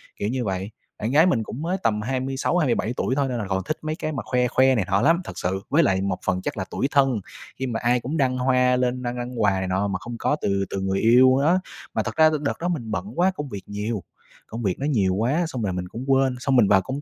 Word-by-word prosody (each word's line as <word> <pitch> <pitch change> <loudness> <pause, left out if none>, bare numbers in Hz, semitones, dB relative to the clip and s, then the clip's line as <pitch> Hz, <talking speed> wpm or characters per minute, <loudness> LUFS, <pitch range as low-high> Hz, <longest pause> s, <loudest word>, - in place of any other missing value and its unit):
kiểu 100 - -2
như 125 0 -2
vậy. 95 +1 -3 0.3
Bạn 110 +3 -2
gái 155 +4 +6
mình 125 -11 +2
cũng 120 +5 -7
mới 175 +4 -1
tầm 105 -1 +1
26, 135 +7 -1
27 125 -7 +1
tuổi 130 - 0
thôi 140 -1 +1
nên 125 - -2
là 105 -4 -3
còn 95 0 -1
thích 155 - -2
mấy 155 0 -3
cái 155 - -4
mà 130 -6 -4
khoe 125 +1 +1
khoe 130 +2 +3
này 105 -6 0
nọ 100 0 +2
lắm, 165 +6 +3
thật - - -9
sự. 95 +2 -2
Với 160 +4 +4
lại 95 -7 +2
một 95 -2 -1
phần 90 -1 0
chắc - - -4
là 95 - -2
tủi 135 - 0
thân 135 -5 +3 0.4
khi 130 - -2
mà 115 -2 -2
ai 120 +1 +3
cũng 135 +7 -4
đăng 130 -2 +1
hoa 125 0 +3
lên 125 0 -1
đăng 120 0 -3
đăng 120 -1 -4
quà 105 -2 +4
này 95 -1 -2
nọ 95 +2 0
mà 95 -2 -2
không 120 +3 -7
có 145 - +1
từ 100 0 0
từ 95 - -3
người 95 0 0
yêu 130 +3 +5
đó. 170 +6 +3 0.3
Mà - - 0
thật - - -5
ra 160 0 +6
thì - - 0
đợt 145 - -2
đó 175 - -1
mình 125 -11 -3
bận 195 - -4
quá, 185 +2 +4
công 150 -4 -5
việc 100 -5 -7
nhiều, 105 -1 -3 0.4
công 115 +1 -6
việc 95 -3 -1
nó 140 - -2
nhiều 100 -11 +1
quá 130 - +1
xong 125 -8 -3
là 95 - -1
mình 90 0 -4
cũng 115 +7 -7
quên. 135 -1 +3
Xong 135 +1 0
mình 120 -5 +5
vào 95 -1 +5
công 130 +8 -5
125 Hz, 285 wpm, -24 LUFS, 100-135 Hz, 0.4 s, gái